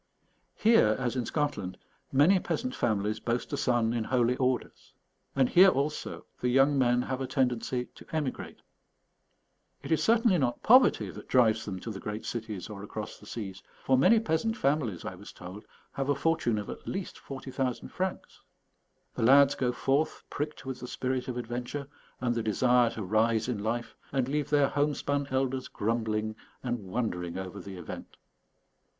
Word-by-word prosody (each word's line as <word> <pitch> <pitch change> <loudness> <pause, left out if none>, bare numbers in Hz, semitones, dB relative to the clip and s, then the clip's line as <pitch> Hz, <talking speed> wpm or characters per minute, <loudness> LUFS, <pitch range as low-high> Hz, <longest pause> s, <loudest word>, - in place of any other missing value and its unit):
Here, 210 - +5
as 125 -1 -2
in 125 -3 -1
Scotland, 145 - -2 0.3
many 160 +8 +5
peasant 255 +7 -2
families 105 - 0
boast 120 +4 -2
a - - +2
son 120 -4 +2
in 115 -2 -1
holy 125 0 +2
orders. 130 -1 -2 0.4
And 135 -2 +4
here 185 +7 +7
also, 150 -1 -2
the 125 - 0
young 135 +3 +4
men 125 -2 +3
have 130 0 -3
a 130 - -2
tendency 125 -1 0
to - - -15
emigrate. 150 -5 -4 1.2
It - - -6
is 160 - +3
certainly 225 -5 +4
not 125 -3 -1
poverty 250 +3 +5
that - - -11
drives 120 -4 +3
them 95 -3 -4
to 115 - -5
the 100 - -6
great 105 +2 -5
cities 110 -5 -4
or 105 -2 -8
across 105 +1 -6
the 105 - -15
seas, 100 -4 -6 0.2
for 130 - +3
many 180 - +5
peasant 220 +3 0
families, 135 - 0
I - - -4
was 95 +3 -11
told, 95 +4 -10 0.3
have 135 0 -3
a 145 - +3
fortune 140 -6 +1
of 105 - -4
at - - -8
least 195 -1 -4
40,000 130 -2 -4
francs. 185 0 -4 0.7
The - - -4
lads 140 +4 +7
go 125 -3 0
forth 140 +5 0
pricked 150 -1 -4
with 130 -1 -5
the 125 - -7
spirit 130 0 -2
of 125 -1 -3
adventure 125 +4 -4 0.3
and 125 -1 0
the 120 - -1
desire 120 +2 +3
to 110 - -5
rise 110 +3 +2
in 120 -5 -2
life, 115 +3 -2 0.2
and 135 -3 0
leave 145 +1 -1
their 145 -2 +4
homespun 145 -1 0
elders 130 0 -1
grumbling 110 0 -1 0.3
and 120 -1 -1
wondering 90 -5 -2
over 95 +1 -6
the 100 -2 -8
event. 85 - -8
125 Hz, 170 wpm, -29 LUFS, 110-140 Hz, 1.2 s, here